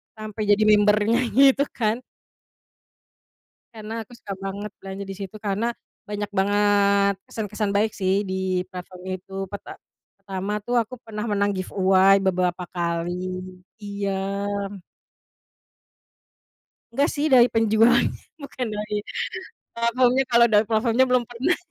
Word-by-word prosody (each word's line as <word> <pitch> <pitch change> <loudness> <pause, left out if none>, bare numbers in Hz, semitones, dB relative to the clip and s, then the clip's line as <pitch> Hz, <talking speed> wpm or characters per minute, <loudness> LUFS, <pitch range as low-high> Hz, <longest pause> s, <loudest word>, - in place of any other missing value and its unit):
sampai 215 0 -7
jadi 205 +1 +4
member-nya, 210 +1 +4 0.2
gitu, 275 +1 +5
kan. 225 0 0 1.7
Karena 215 0 -7
aku 220 - -13
suka 200 -3 -7
banget 200 +2 -5
belanja 195 +1 -6
di 195 - -7
situ, 195 0 -7
karena 210 +2 -1 0.4
banyak 205 0 -3
banget 200 0 +3 0.2
kesan-kesan 210 -1 -3
baik 205 +2 +1
sih 195 +1 0
di 185 -1 -1
platform 180 0 -9
itu, 185 +1 -9
perta 200 +1 -9 0.4
pertama 195 +1 -3
tuh 245 - -1
aku 225 +2 -8
pernah 215 0 -5
menang 205 0 +1
giveaway, 190 +1 +4
beberapa 180 -1 0
kali. 170 0 -1 0.7
Iya. 200 -1 -3 2.8
Enggak 280 +4 +2
sih 300 +1 0
dari 250 -3 +7
penjualnya, 225 +2 +4 0.3
bukan 270 -2 -5
dari 210 0 -3 0.8
platformnya, 245 +3 +2
kalo 235 0 +6
dari 210 +1 +5
platformnya 230 +3 +3
belum 250 -1 +3
pernah. 245 +9 0
205 Hz, 120 wpm, -24 LUFS, 195-230 Hz, 2.8 s, dari